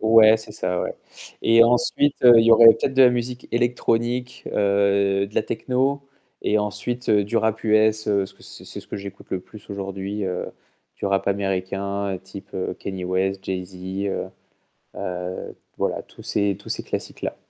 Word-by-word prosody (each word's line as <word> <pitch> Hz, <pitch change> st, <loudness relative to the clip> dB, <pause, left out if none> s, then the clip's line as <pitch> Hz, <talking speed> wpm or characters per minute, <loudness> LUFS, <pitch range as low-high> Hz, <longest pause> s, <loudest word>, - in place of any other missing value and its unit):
ouais, 110 Hz, 0 st, +6 dB
c'est 110 Hz, -1 st, -10 dB
ça 90 Hz, -3 st, -2 dB
ouais -, -, -3 dB, 0.5 s
et 115 Hz, +1 st, +6 dB
ensuite, 125 Hz, +4 st, +3 dB
heu, 120 Hz, -1 st, +10 dB
il 115 Hz, -, +5 dB
y 115 Hz, -, +5 dB
aurait 115 Hz, 0 st, +8 dB
peut-être 115 Hz, +4 st, +5 dB
de 135 Hz, -, +6 dB
la 125 Hz, -, +7 dB
musique 125 Hz, +1 st, -3 dB
électronique, 120 Hz, 0 st, 0 dB
heu, 100 Hz, -1 st, +2 dB
de 105 Hz, -, -17 dB
la -, -, +2 dB
techno 135 Hz, +2 st, -1 dB, 0.4 s
et 105 Hz, -, +2 dB
ensuite 105 Hz, +4 st, -3 dB
du 105 Hz, +2 st, +2 dB
rap 110 Hz, -1 st, 0 dB
US, 110 Hz, 0 st, +3 dB
heu, 100 Hz, -1 st, +3 dB
parce 95 Hz, -1 st, -2 dB
que -, -, -21 dB
c'est -, -, -8 dB, 0.2 s
ce -, -, -14 dB
que -, -, -5 dB
j'écoute 100 Hz, 0 st, -9 dB
le 95 Hz, -, -2 dB
plus 105 Hz, +3 st, -14 dB
aujourd'hui, 100 Hz, +1 st, -4 dB
heu, 90 Hz, -1 st, -3 dB, 0.5 s
du -, -, -3 dB
rap 100 Hz, 0 st, 0 dB
américain 100 Hz, 0 st, -2 dB
type 95 Hz, +1 st, -11 dB, 0.3 s
Kanye 95 Hz, -2 st, -5 dB
West, 95 Hz, +1 st, -1 dB
Jay 95 Hz, -1 st, -3 dB
Z, 90 Hz, +1 st, -14 dB, 0.3 s
heu 95 Hz, -, -2 dB, 0.7 s
heu, 90 Hz, 0 st, -5 dB, 0.2 s
voilà, -, -, -2 dB
tous -, -, -15 dB
ces 100 Hz, -2 st, 0 dB
tous 100 Hz, -, -13 dB
ces -, -, -2 dB
classiques-là. -, -, -5 dB
100 Hz, 175 wpm, -23 LUFS, 95-115 Hz, 0.7 s, heu